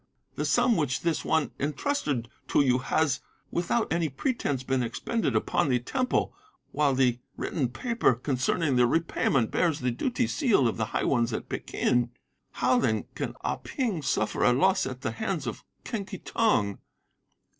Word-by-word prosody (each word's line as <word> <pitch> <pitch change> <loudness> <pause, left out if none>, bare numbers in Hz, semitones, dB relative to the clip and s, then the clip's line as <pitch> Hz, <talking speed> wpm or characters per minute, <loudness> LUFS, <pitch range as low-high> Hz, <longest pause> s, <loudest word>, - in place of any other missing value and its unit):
'The - - -2
sum 235 - +3
which 145 -7 0
this 170 -2 0
one 160 -2 +1
entrusted 145 - -1 0.2
to - - +3
you 125 -1 +3
has, 140 +2 +1 0.3
without 180 +4 0
any 165 -2 +1
pretence 140 - -1
been 130 -1 0
expended 135 - -1
upon 110 +6 +1
the 125 - +3
Temple, 250 - -1 0.4
while 145 -2 +2
the 125 -2 +2 0.2
written 135 -7 -1
paper 230 - +1
concerning 135 +3 0
the 125 0 +5
repayment 135 -5 +1
bears 165 -4 +1
the 125 -2 0
duty 245 - 0
seal 225 - +2
of 115 - -2
the 110 - 0
high - - -2
ones 120 -3 +2
at - - -4
Peking. 120 -1 0 0.4
How, 125 0 +2
then, 110 -4 0
can - - -4
Ah - - -1
Ping 225 - -2
suffer - - 0
a 125 - +5
loss 190 +5 +3
at 130 -1 -6
the - - -2
hands 195 -10 -3
of 120 - -5 0.2
Quen 220 -4 -3
Ki - - -7
Tong? 115 - +1
140 Hz, 165 wpm, -28 LUFS, 125-180 Hz, 0.4 s, the